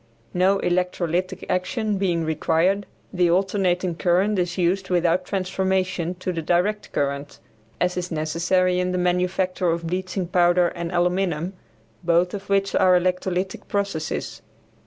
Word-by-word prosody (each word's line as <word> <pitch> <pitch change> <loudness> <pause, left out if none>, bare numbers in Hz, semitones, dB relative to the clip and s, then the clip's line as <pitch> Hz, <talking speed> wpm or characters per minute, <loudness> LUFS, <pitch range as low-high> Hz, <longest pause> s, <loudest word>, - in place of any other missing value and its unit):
No 185 +2 +3
electrolytic 180 -1 -1
action 205 +3 -1
being 175 -4 0
required, 165 +5 +1 0.3
the 180 -2 +3
alternating 185 -1 +1
current 185 +4 +1
is 175 0 -1
used 185 +2 0
without 180 0 +2
transformation 185 -2 -1
to 185 0 -4
the 165 - -3
direct 180 +6 0
current, 140 0 -2 0.4
as 180 0 +1
is 180 0 -2
necessary 175 +3 +1
in 180 0 0
the - - 0
manufacture 180 0 0
of 165 0 -1
bleaching 185 +2 -2
powder 175 0 +3
and 170 -1 -5
aluminum, 180 -1 0 0.5
both 175 +1 +2
of 200 -1 -7
which 195 0 +1
are 185 -1 +5
electrolytic 185 +1 -2
processes. 200 -6 -3
180 Hz, 135 wpm, -23 LUFS, 175-190 Hz, 0.5 s, are